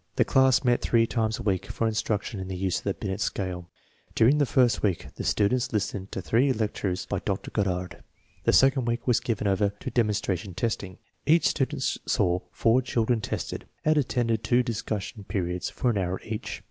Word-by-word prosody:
The - - +3
class 130 0 +4
met 125 -1 +2
three 115 -1 +3
times 110 -1 -1
a - - -7
week 95 -2 0
for 115 - -2
instruction 110 -1 -2
in 95 - -5
the 95 - -4
use 95 0 0
of - - -19
the 100 - 0
Binet 95 -1 -4
scale. 90 -4 -3 0.5
During 130 +7 +5
the 145 - +3
first 125 -2 +3
week 95 -5 -1
the - - -6
students 115 +4 +1
listened 100 -2 -2
to 95 - -4
three 125 +9 +3
lectures 105 -4 -2
by 100 - -2
Dr. 100 +1 -3
Goddard. 90 -4 -2 0.4
The - - +3
second 135 -1 +4
week 120 0 -2
was 125 -2 +3
given 110 -3 -2
over 100 0 +2
to 130 - -5
demon 110 -3 +2
stration 95 -3 -3
testing., 95 -3 -2 0.3
Each 165 +3 +5
student 135 -3 -1
saw 90 0 +1
four 115 +3 +3
children 120 -2 0
tested, 110 -7 -4 0.2
and 155 0 +4
attended 120 -5 0
two 120 +3 +3
discussion 110 -3 -4
periods 90 -3 -2
of - - -7
an 115 -5 +3
hour 95 0 -2
each. 110 -1 -5
110 Hz, 195 wpm, -27 LUFS, 95-120 Hz, 0.5 s, During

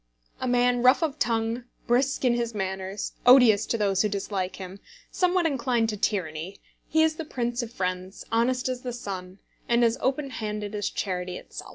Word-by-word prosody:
A 255 - -2
man 245 0 +3
rough 255 +6 +5
of 305 -2 -2
tongue, 230 +1 0 0.2
brusque 260 +3 +1
in 245 - +4
his 235 -1 -2
manners, 190 0 -3
odious 245 -4 +7
to 230 - 0
those 195 -3 +2
who 210 - +1
dislike 195 -2 -3
him, 190 +1 -8 0.3
somewhat 360 -1 +2
inclined 245 -6 +1
to 215 - -2
tyranny, 180 -3 -2 0.3
he 315 +1 +4
is 315 -1 +1
the 325 - -3
prince 240 -4 -2
of 235 -1 -6
friends, 185 -1 -4
honest 250 +3 +1
as 255 -1 -3
the 250 -1 -4
sun, 190 -5 -6 0.3
and 235 0 +4
as 230 +1 +1
open 275 +1 0
handed 210 -2 -4
as 205 -1 -1
Charity 180 -2 -3
itself. - - -10
230 Hz, 185 wpm, -26 LUFS, 195-250 Hz, 0.3 s, odious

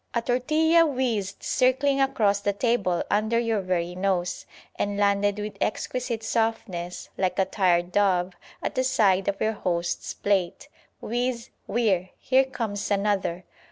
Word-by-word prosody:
A 235 - +2
tortilla 310 +7 +3
whizzed 240 -10 -1
circling 270 +2 +2
across 210 -7 +2
the 200 0 0
table 205 -5 0
under 215 +3 +2
your 230 -3 +1
very 180 -2 -1
nose, 185 -1 -1 0.3
and 205 0 -2
landed 205 0 +2
with 210 0 -5
exquisite 235 +1 -2
softness, 220 -6 -2
like 185 -1 0
a 190 - +3
tired 180 -2 +1
dove, 185 -2 +2 0.3
at - - -2
the 255 - 0
side 205 -8 +2
of 200 0 -1
your 220 0 +1
host's 175 -4 -2
plate. 195 -4 -1 0.3
Whizz, 240 +1 -2 0.2
whirr! 190 -6 +1
here 265 +1 +3
comes 230 -6 -4
another! 200 -3 0
205 Hz, 140 wpm, -25 LUFS, 190-240 Hz, 0.3 s, tortilla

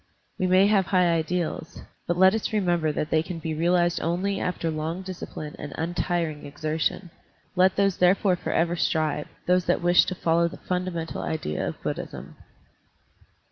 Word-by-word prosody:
We 185 - +1
may 185 +2 +5
have 200 -3 +3
high 180 -3 +3
ideals, 165 0 -2 0.2
but 175 - 0
let 190 +1 +6
us 220 - -2
remember 175 -7 +1
that 150 +1 -3
they 155 - +4
can 170 +1 -6
be 160 0 -4
realized 175 +2 +2
only 185 +4 -1
after 170 -2 -2
long 160 +4 -3
discipline 175 -5 -7
and 145 - -7
untiring 170 -2 -2
exertion. 155 +4 -2 0.4
Let 185 +1 +4
those 195 -2 +2
therefore 185 +1 +4
for - - -4
ever 170 +1 +1
strive 155 -3 0
— - - -35
those 180 0 +3
that - - +1
wish 175 0 +5
to 185 - -3
follow 170 0 +2
the 170 - -8
funda 180 0 -2
mental 165 -2 -4
idea 155 - -2
of - - -5
Buddhism. - - -5
175 Hz, 175 wpm, -25 LUFS, 160-185 Hz, 0.4 s, let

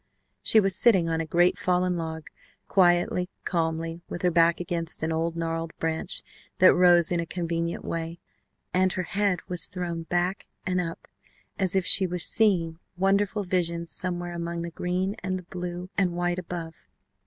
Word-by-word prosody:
She 220 - +6
was 195 -2 +3
sitting 195 -6 +4
on 165 0 0
a 160 - -5
great 175 +3 +2
fallen 180 0 +1
log, 160 -2 -5 0.4
quietly, 180 -1 +2
calmly, 165 -1 -2
with 175 - -6
her 180 - +3
back 165 0 +3
against 170 -2 -3
an 160 - 0
old 165 +1 -1
gnarled 165 0 -3
branch 165 +2 -1 0.3
that 185 - +7
rose 175 -2 +5
in 175 - +1
a 170 - -3
convenient 170 -1 -3
way, 165 +1 -4 0.5
and 185 0 +3
her 185 - -2
head 195 -1 0
was 180 -1 +1
thrown 175 -2 -4
back 175 +3 -2 0.2
and 180 -1 0
up 165 -1 -6 0.5
as 190 -1 +1
if 190 -1 +2
she 190 - +6
were 180 0 -3
seeing 175 -4 +1 0.2
wonderful 200 +2 +1
visions 170 -2 -1
somewhere 175 -1 -2
among 170 0 -4
the 170 - -5
green, 185 +4 -2
and 185 0 -1
the 185 - -9
blue 180 +1 -6
and 180 -3 +1
white 175 +1 -1
above. 170 -2 -7
175 Hz, 170 wpm, -26 LUFS, 165-185 Hz, 0.5 s, that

